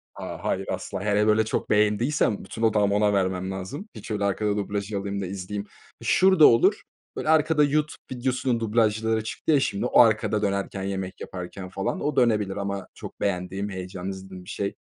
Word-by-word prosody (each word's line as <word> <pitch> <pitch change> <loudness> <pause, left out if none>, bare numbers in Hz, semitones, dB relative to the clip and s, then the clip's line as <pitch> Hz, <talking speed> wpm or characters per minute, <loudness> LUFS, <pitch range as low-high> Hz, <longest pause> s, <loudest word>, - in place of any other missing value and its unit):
A, - - -7
hayır, - - -1
asla. - - -4
Hele, 105 0 +2
böyle 110 0 +4
çok - - -2
beğendiysem 105 +3 +2
bütün 110 +4 -8
odağımı 105 -2 +3
ona 105 0 +3
vermem 95 -1 0
lazım. 95 - -6
Hiç - - -8
öyle 105 -1 -1
arkada 105 +1 0
dublaja 100 0 -2
alayım 100 0 -3
da - - -2
izleyeyim. 100 +2 -5 0.4
Şurada 190 -4 +5
olur. 115 - +4 0.3
Böyle, 155 - -3
arkada 155 -1 +4
YouTube 150 +1 0
videosunun 125 -1 -1
dublajları 110 0 +1
çıktı 110 - -2
ya 145 - +5
şimdi. 100 -2 -1
O - - +3
arkada 110 -2 +3
dönerken 100 -1 -2
yemek 95 -1 -4
yaparken, 90 +1 -7
falan, 95 +1 -3
o 150 - -1
dönebilir 105 -6 +2
ama 100 -1 -3
çok - - -10
beğendiğim 95 +1 -2
heyecanlı 95 0 -6
izlediğim 95 -1 -8
bir 95 - -13
şey. 100 0 -3
105 Hz, 175 wpm, -25 LUFS, 95-115 Hz, 0.4 s, Şurada